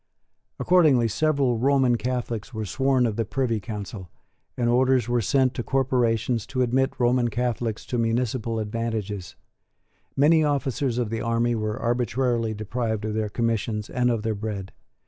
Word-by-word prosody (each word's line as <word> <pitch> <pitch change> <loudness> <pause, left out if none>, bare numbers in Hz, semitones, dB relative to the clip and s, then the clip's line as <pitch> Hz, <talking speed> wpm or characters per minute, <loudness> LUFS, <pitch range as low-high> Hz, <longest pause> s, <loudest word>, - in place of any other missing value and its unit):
Accordingly 155 -10 +4
several 135 -1 +1
Roman 130 -1 +3
Catholics 120 -1 -3
were 110 -1 -3
sworn 130 +4 +1
of 110 -2 -2
the 115 - +1
Privy 115 0 -1
Council; 100 -3 -7 0.5
and 120 - +1
orders 125 0 +3
were 120 0 +1
sent 130 +3 +2
to - - -3
corporations 120 -4 0
to 130 0 0
admit 130 +2 +1
Roman 120 0 +3
Catholics 120 -1 -2
to 120 - -2
municipal 115 0 -1
advantages. 110 -3 -3 0.8
Many 155 +3 +5
officers 140 -3 0
of 120 -3 -1
the 115 0 -2
army 115 +1 +1
were 110 -1 -2
arbitrarily 120 -1 0
deprived 110 0 -3
of 110 - -2
their 110 -1 -1
commissions 110 -1 -2
and 125 0 +1
of 115 -3 -1
their 110 -1 0
bread. 100 -2 -5
120 Hz, 150 wpm, -25 LUFS, 110-130 Hz, 0.8 s, Many